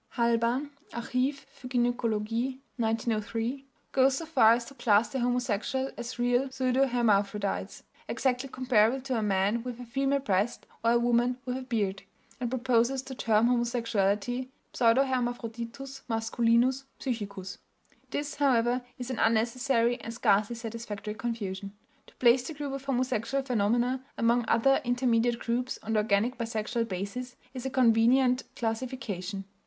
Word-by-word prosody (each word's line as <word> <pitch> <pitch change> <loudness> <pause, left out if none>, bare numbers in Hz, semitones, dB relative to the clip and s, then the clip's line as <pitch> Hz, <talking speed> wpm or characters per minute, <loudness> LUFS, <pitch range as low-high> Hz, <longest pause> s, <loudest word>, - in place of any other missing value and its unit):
Halban 235 +4 +1 0.2
(Archiv 255 +4 -1
für 250 - -11
Gynäkologie 240 0 0 0.2
1903) 225 +3 -1 0.3
goes 265 0 +4
so 330 - -4
far 250 -8 +5
as 235 0 -1
to 275 - -11
class 215 -4 +3
the 265 - -2
homosexual 245 +2 0
as 240 +1 -6
"real 245 +2 +2
pseudohermaphrodites," 240 -6 +1 0.2
exactly 260 0 -1
comparable 255 -1 +2
to 260 -1 -3
a 225 - 0
man 205 +2 +1
with 250 -1 -6
a 245 - -7
female 275 +3 0
breast 210 -2 0 0.2
or 230 +1 +4
a - - +5
woman 240 +1 +2
with 250 -1 -2
a 260 - -4
beard, 210 -7 -1 0.4
and 245 -1 -2
proposes 255 +1 +1
to 265 0 -8
term 225 -3 +2
homosexuality 235 -1 0 0.3
"pseudohermaphroditus 245 +1 0
masculinus 235 +3 +2
psychicus." 200 -7 -5 0.5
This, 290 0 -3
however, 250 -3 +2 0.2
is 250 +1 -5
an 255 - -3
unnecessary 235 +2 +2
and 230 - -6
scarcely 215 -1 +2
satisfactory 225 -2 -6
confusion. 205 -4 -4 0.3
To - - -19
place 245 +1 +5
the 320 - -6
group 285 -2 -4
of 275 0 -6
homosexual 255 0 0
phenomena 245 +2 +1
among 235 +1 +2
other 270 +5 +3
intermediate 245 -1 +2
groups 245 +2 -2
on 220 - -2
the 215 - +3
organic 215 +4 +1
bisexual 230 0 -2
basis 200 +7 -5 0.2
is 260 0 -4
a - - -1
convenient 250 +1 +4
classification. 225 -5 -3
240 Hz, 140 wpm, -29 LUFS, 225-255 Hz, 0.5 s, far